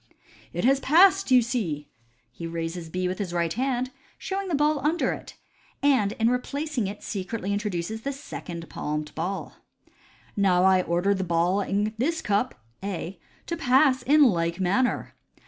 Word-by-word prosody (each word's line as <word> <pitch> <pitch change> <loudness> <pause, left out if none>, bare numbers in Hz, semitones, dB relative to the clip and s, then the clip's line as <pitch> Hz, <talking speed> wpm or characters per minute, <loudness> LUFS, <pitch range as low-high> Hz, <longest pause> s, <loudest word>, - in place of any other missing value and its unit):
" - - -24
It - - -2
has 270 +1 +4
passed, 370 +7 +5
you 250 -2 +6
see! 175 - -2 0.2
" 120 -1 -41
He 165 +6 -7
raises 165 0 -4
B 185 +2 -1
with 185 +2 -3
his 185 -4 -3
right 170 -1 0
hand, 255 0 -1 0.3
showing 390 0 -3
the 345 - 0
ball 295 +1 +2
under 305 +5 +1
it, - - -10 0.5
and 250 -8 +3
in 225 - +1
replacing 255 0 -1
it 205 +1 -7
secretly 200 0 -3
introduces 205 0 -3
the 275 - -2
second 175 - -7
palmed 150 0 -4
ball. 180 +5 -4 0.4
" - - -29 0.3
Now 185 -3 +3
I 190 -1 +5
order 175 +3 +1
the 190 -1 -2
ball 175 +3 +1
in 205 +2 -1
this 320 +6 0
cup 210 +5 0 0.3
(A) 185 -2 -4 0.3
to 340 - -3
pass 265 -3 +4
in 295 +4 +5
like 170 -7 +2
manner." 200 +8 +1
205 Hz, 170 wpm, -26 LUFS, 175-265 Hz, 0.5 s, you